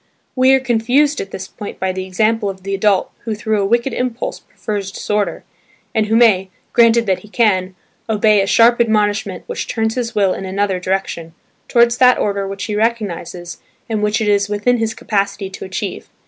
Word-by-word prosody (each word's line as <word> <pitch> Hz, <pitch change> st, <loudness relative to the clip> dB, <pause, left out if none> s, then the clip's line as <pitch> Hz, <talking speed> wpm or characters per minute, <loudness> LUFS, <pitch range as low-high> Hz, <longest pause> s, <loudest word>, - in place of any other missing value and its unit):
We 260 Hz, 0 st, +4 dB
are -, -, +2 dB
confused 260 Hz, +4 st, +1 dB
at 195 Hz, -, -7 dB
this 190 Hz, 0 st, -7 dB
point 205 Hz, -, -9 dB
by 190 Hz, 0 st, 0 dB
the 185 Hz, 0 st, -5 dB
example 215 Hz, +3 st, +1 dB
of 190 Hz, -1 st, -8 dB
the 195 Hz, +1 st, -3 dB
adult 195 Hz, -1 st, +1 dB
who 220 Hz, -2 st, -4 dB
through 215 Hz, -1 st, -1 dB
a -, -, +1 dB
wicked 235 Hz, +4 st, +1 dB
impulse 250 Hz, -1 st, -3 dB
prefers 200 Hz, -2 st, -5 dB
disorder, 210 Hz, +1 st, -2 dB, 0.5 s
and 215 Hz, -1 st, +1 dB
who 220 Hz, -, +1 dB
may 205 Hz, -5 st, +4 dB, 0.2 s
(granted 235 Hz, 0 st, +5 dB
that 190 Hz, -3 st, +1 dB
he 210 Hz, -, -15 dB
can) 190 Hz, -4 st, +1 dB, 0.3 s
obey 215 Hz, -1 st, +3 dB
a 195 Hz, -, -1 dB
sharp 235 Hz, +3 st, +5 dB
admonishment 210 Hz, -4 st, 0 dB
which -, -, -5 dB
turns 220 Hz, -1 st, -1 dB
his 235 Hz, -2 st, -3 dB
will 195 Hz, -3 st, +3 dB
in -, -, -6 dB
another 190 Hz, 0 st, -1 dB
direction, 180 Hz, -3 st, -3 dB, 0.3 s
towards 235 Hz, 0 st, +3 dB
that 250 Hz, -1 st, +6 dB
order 200 Hz, -1 st, -1 dB
which 195 Hz, 0 st, -5 dB
he 210 Hz, -, -3 dB
recognises 195 Hz, -6 st, -3 dB, 0.3 s
and 220 Hz, -2 st, -2 dB
which 210 Hz, +1 st, +1 dB
it 215 Hz, -, 0 dB
is 205 Hz, 0 st, +2 dB
within 210 Hz, +4 st, +1 dB
his 220 Hz, 0 st, -1 dB
capacity 200 Hz, -3 st, -2 dB
to -, -, -8 dB
achieve. 190 Hz, +1 st, -5 dB
210 Hz, 190 wpm, -18 LUFS, 195-230 Hz, 0.5 s, that